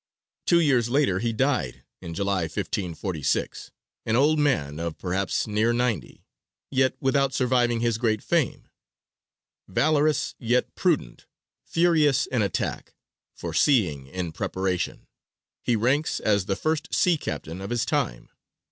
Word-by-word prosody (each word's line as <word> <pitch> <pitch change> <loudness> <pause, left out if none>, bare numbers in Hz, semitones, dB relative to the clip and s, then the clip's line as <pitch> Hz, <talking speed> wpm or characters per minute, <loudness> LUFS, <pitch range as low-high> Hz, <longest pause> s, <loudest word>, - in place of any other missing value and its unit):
Two 170 - +5
years 130 -8 +3
later 125 -8 +2
he 115 +2 0
died, 115 - -1 0.2
in 85 -1 -7
July, 100 -2 0
1546, 85 -2 -2 0.4
an 110 - +2
old 150 +5 +4
man 80 - 0
of 85 -1 -4
perhaps 95 +1 -1
near 110 +2 +1
ninety, 120 -2 -2 0.5
yet 130 -1 +2
without 135 0 +1
surviving 120 -2 +2
his 115 -2 0
great 110 -3 0
fame. - - 0 1.0
"Valorous 150 +6 +2
yet 125 +1 0
prudent, - - -1 0.4
furious 160 -5 +3
in 125 -4 -1
attack, 100 - -3 0.4
foreseeing 85 - +1
in 90 +3 -4
preparation," 95 +1 -2 0.6
he 120 - +1
ranks 130 +8 +1
as 100 -3 +1
the 95 - 0
first 155 - -2
sea 180 -2 +4
captain 80 - -5
of 100 - -6
his 120 -1 0
time. - - -2
115 Hz, 130 wpm, -25 LUFS, 95-135 Hz, 1.0 s, Two